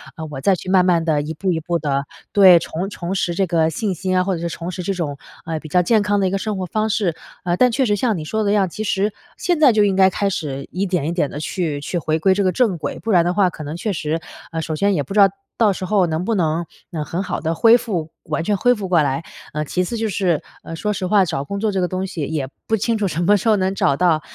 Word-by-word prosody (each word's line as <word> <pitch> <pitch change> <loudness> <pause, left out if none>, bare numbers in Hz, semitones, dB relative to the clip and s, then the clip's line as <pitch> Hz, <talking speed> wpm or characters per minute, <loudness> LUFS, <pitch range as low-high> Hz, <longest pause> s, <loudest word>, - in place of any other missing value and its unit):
啊， 160 - -7
我 135 - -5
再 195 +3 +3
去 185 - -8
慢 185 -1 +5
慢 170 -2 +3
地 155 -2 +2
一 150 +2 -4
步 185 +4 -1
一 165 - 0
步 170 +2 -1
地 140 -1 -1 0.3
对， 190 -3 +8
重 170 +4 -4
重 180 -2 -5
拾 175 -2 0
这 195 - +2
个 165 -2 +2
信 205 +2 -2
心 185 +2 -2
啊， 180 - +3
或 190 -1 -1
者 165 - -6
是 170 - -1
重 170 +1 -6
拾 180 - -5
这 195 +2 -1
种， 150 -6 -3 0.3
呃， 160 -1 -3
比 155 - -10
较 180 +4 +3
健 220 +4 +3
康 205 0 +1
的 195 - +2
一 185 - -1
个 195 - 0
生 210 +1 -3
活 185 - -3
方 215 +3 0
式。” 200 -6 0 0.3
呃， 175 0 0
但 250 +4 +4
确 260 +3 +1
实 205 - +2
像 220 +1 0
你 155 - -5
说 220 +7 -1
的 200 - +1
一 - - +3
样， 195 -3 +2
其 215 - -5
实 205 0 0 0.3
现 350 -3 0
在 290 -5 +7
就 215 -2 +3
应 200 -2 +2
该 190 0 +6
开 200 +2 -1
始 140 -7 -4
一 190 +2 -1
点 180 -6 -1
一 165 - 0
点 170 -5 0
地 145 - -6
去 155 -2 -2
去 175 - -3
回 160 -1 0
归 190 +4 +4
这 200 +1 0
个 185 - +2
正 220 -5 +1
轨， - - -4
不 225 - -6
然 175 -3 +5
的 175 - +1
话 190 -1 +3
可 160 - -9
能 150 +2 -5
确 200 +5 -2
实， 155 0 -2 0.3
呃， 165 -1 -2
首 155 0 -3
先 200 +5 +2
也 150 - +1
不 140 - -7
知 210 - +2
道 200 - +8 0.3
到 220 -3 +4
时 185 - -5
候 195 -1 +3
能 160 +2 -2
不 230 - 0
能， 165 -1 0 0.3
嗯， 155 -3 -3
很 175 - -3
好 - - -3
地 160 +1 -1
恢 230 +3 +6
复 180 -10 -3
完 165 - -2
全 205 +3 +1
恢 245 +6 +4
复 200 -4 -5
过 175 -3 +3
来。 140 +3 -1 0.3
呃， 150 0 -1
其 180 +5 -1
次 230 +6 -4
就 220 -1 -1
是， 180 -5 0 0.2
呃， 165 - -7
说 210 +6 -2
实 185 - -3
话， 200 0 +4
找 140 -4 -2
工 200 +7 -5
作 215 0 0
这 195 - -1
个 180 - +1
东 185 +2 -3
西 170 - -6
也 145 -2 -2 0.2
不 220 - +2
清 225 +2 0
楚 210 -2 0
什 175 0 -2
么 205 +3 +5
时 200 - -4
候 215 - +5
能 190 0 0
找 140 - +2
到， 165 -3 +3
185 Hz, 325 characters per minute, -20 LUFS, 160-205 Hz, 0.3 s, 对